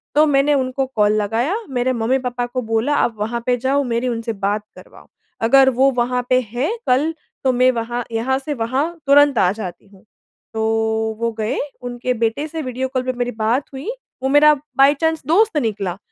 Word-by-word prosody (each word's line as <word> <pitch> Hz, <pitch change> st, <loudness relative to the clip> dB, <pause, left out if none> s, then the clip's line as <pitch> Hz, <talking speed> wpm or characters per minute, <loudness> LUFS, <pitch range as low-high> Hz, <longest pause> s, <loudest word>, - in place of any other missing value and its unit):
तो 305 Hz, +1 st, +6 dB
मैंने 290 Hz, 0 st, +3 dB
उनको 265 Hz, -1 st, 0 dB
कॉल 210 Hz, 0 st, +3 dB
लगाया 235 Hz, -, 0 dB
मेरे 255 Hz, -1 st, 0 dB
मम्मी-पापा 245 Hz, +1 st, -1 dB
को 255 Hz, +1 st, -4 dB
बोला 225 Hz, +5 st, 0 dB
आप 235 Hz, -5 st, +1 dB
वहाँ 230 Hz, +3 st, -2 dB
पे 250 Hz, -1 st, +2 dB
जाओ 270 Hz, +3 st, +1 dB
मेरी 240 Hz, 0 st, -1 dB
उनसे 230 Hz, -1 st, -3 dB
बात 205 Hz, +1 st, -2 dB
करवाओ। -, -, -15 dB, 0.4 s
अगर 265 Hz, +3 st, +6 dB
वो 265 Hz, +2 st, +3 dB
वहाँ 250 Hz, +1 st, 0 dB
पे 255 Hz, -, +4 dB
है 255 Hz, -, -1 dB, 0.2 s
कल, 280 Hz, +6 st, +2 dB, 0.3 s
तो 260 Hz, -, +3 dB
मैं 255 Hz, +1 st, +4 dB
वहाँ 240 Hz, 0 st, -3 dB
यहाँ 235 Hz, +4 st, 0 dB
से 290 Hz, +2 st, -4 dB
वहाँ 260 Hz, +3 st, -1 dB, 0.2 s
तुरंत 285 Hz, -1 st, +5 dB
आ 185 Hz, -3 st, +4 dB
जाती 190 Hz, -3 st, -7 dB
हूँ। 195 Hz, 0 st, -21 dB, 0.5 s
तो 220 Hz, -, -2 dB, 0.6 s
वो 230 Hz, 0 st, 0 dB
गए 215 Hz, +1 st, -1 dB, 0.2 s
उनके 245 Hz, 0 st, -3 dB
बेटे 230 Hz, +5 st, -1 dB
से 320 Hz, +1 st, -5 dB
वीडियो 260 Hz, -1 st, -3 dB
कॉल 255 Hz, -, +1 dB
पे 255 Hz, 0 st, -2 dB
मेरी 245 Hz, 0 st, -1 dB
बात 230 Hz, +4 st, 0 dB
हुई, 270 Hz, +10 st, -6 dB, 0.3 s
वो 265 Hz, -, +1 dB
मेरा 295 Hz, +2 st, +6 dB, 0.2 s
बाय 275 Hz, +1 st, +6 dB
चाँस 320 Hz, -1 st, +1 dB
दोस्त 380 Hz, +2 st, +3 dB
निकला, 200 Hz, -8 st, -2 dB
250 Hz, 190 wpm, -19 LUFS, 230-275 Hz, 0.6 s, तो